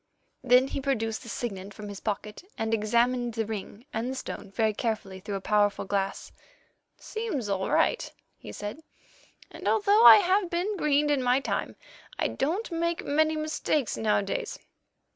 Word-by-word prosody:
Then 255 +1 +5
he - - -3
produced 225 -5 -1
the 235 - -10
signet 200 -5 -5
from 210 -1 -8
his 200 -1 -7
pocket, 210 - -4
and 225 0 -1
examined 235 +2 +1
the 225 -1 -1
ring 215 +2 -7
and 230 +3 -2
the 265 - -3
stone 255 - -6
very 220 +2 +1
carefully 210 -4 -3
through 200 +1 -5
a 195 - -4
powerful 205 -1 +1
glass. 195 0 -2 0.7
"Seems 385 - -4
all 195 -1 -1
right," - - +1 0.2
he - - -10
said, 210 +9 -6 0.7
"and - - -7
although 425 0 +4
I - - +12
have 380 -1 +2
been 360 +5 -1
greened 295 -4 +2
in 285 -2 +2
my 250 +1 +3
time, 275 - -3 0.4
I - - 0
don't 350 - -2
make 335 0 -1
many 315 +2 +2
mistakes 310 -3 -1
nowadays. 210 -2 -1
240 Hz, 160 wpm, -27 LUFS, 210-310 Hz, 0.7 s, I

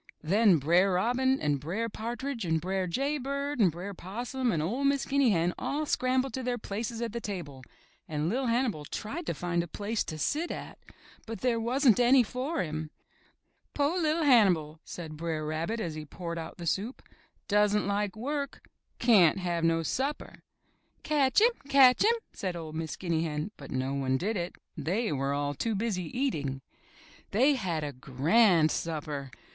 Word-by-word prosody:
Then 195 +2 +4
Br*er 175 +7 +3
Robin 250 +7 +2
and 145 -2 0
Br*er 185 +11 -2
Partridge 235 +3 -4
and 160 -2 +1
Br'er 185 +2 -1
Jay 275 - -1
Bird 280 +1 -3
and 190 -6 +5
Br'er 180 +5 -6
Possum 240 +7 -3
and 155 -3 0
01' 265 +8 0
Miss 280 -1 0
Guinea 275 -2 +3
Hen 175 -3 +2
all 300 +2 -1
scrambled 255 -1 +1
to 260 - -3
their 245 -1 -1
places 225 +2 -4
at 230 -2 -4
the 235 - -3
table 170 -11 -6 0.5
and 150 0 -2
LiT 250 +6 0
Hannibal 230 - 0
tried 265 - -5
to - - -1
find 175 -1 -1
a 170 - -5
place 210 +6 -2
to 155 - -5
sit 305 - -1
at, - - -7 0.5
but 225 0 -6
there 245 -2 +1
wasn't 245 +1 +3
any 250 +1 +6
for 260 +8 -2
him. 155 -1 -4 0.9
*To' 290 - +1
LiT 320 0 +1
Hannibal!" 180 - +4
said 160 -3 -8
Br'er 160 -1 -3
Rabbit 165 +9 -2
as 170 -7 -3
he 155 0 -6
poured 170 +2 -6
out 160 0 -7
the 170 - -7
soup. 205 +9 -2 0.2
*' - - -42
Doesn't 210 0 +3
like 200 0 -1
work. 280 +5 -4 0.3
Cyan't 200 -9 +5
have 175 -3 -2
no 165 0 +2
supper!" 270 - -3 0.6
Catch 290 +3 +3
him! 470 +2 +6 0.2
Catch 265 -2 +6
him!" 455 +3 +5 0.2
said 185 -2 -3
01' 160 -2 -7
Miss 160 -1 -3
Guinea 170 -3 -1
Hen, 155 +4 -3
but 140 - -11
no 130 +1 -2
one 135 -1 0
did 210 +9 -1
it. 175 -2 -3 0.2
They 205 - -1
were 135 -1 -1
all 145 0 -1
too 225 - -2
busy 195 -4 -1
eating. 145 - -1 0.7
They 260 +8 +4
had 180 - -2
a 145 - -3
grand 155 - +3
supper. 150 -4 -3
200 Hz, 180 wpm, -29 LUFS, 160-250 Hz, 0.9 s, any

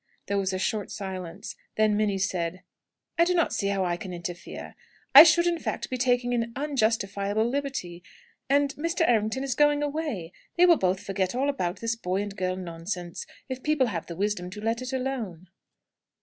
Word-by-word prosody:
There 200 0 0
was 190 -1 0
a 185 - -1
short 210 +1 -1
silence. 190 -2 -6 0.2
Then 215 -1 +3
Minnie 205 -2 +1
said: 185 -2 -2 0.6
"I - - +8
do 360 +1 +2
not 335 - +2
see 200 - -1
how 195 -1 0
I 175 -1 0
can 185 +1 -7
interfere. 175 0 -7 0.4
I - - +14
should, 340 +1 +6
in 345 -1 +1
fact, - - -4
be 255 - -1
taking 245 -1 +2
an 230 -1 -1
unjustifiable 220 -6 0
liberty, 255 -10 -3 0.5
and 280 0 +3
Mr. 335 +3 0
Errington 225 +2 +1
is 270 -2 -1
going 295 +2 +3
away. 285 - -3 0.2
They 355 - +7
will 345 -2 +6
both 185 0 +1
forget 190 +1 -1
all 275 +3 +1
about 185 -10 -2
this 230 0 0
boy 195 -3 -1
and 205 -1 -7
girl 185 -1 -1
nonsense, 175 0 -5 0.2
if 260 -1 -5
people 300 -2 +2
have 165 - -4
the 170 - -6
wisdom 195 -1 -1
to 200 +3 -8
let 225 +3 -1
it 255 +1 -5
alone." 240 -10 -4
215 Hz, 190 wpm, -27 LUFS, 185-270 Hz, 0.6 s, I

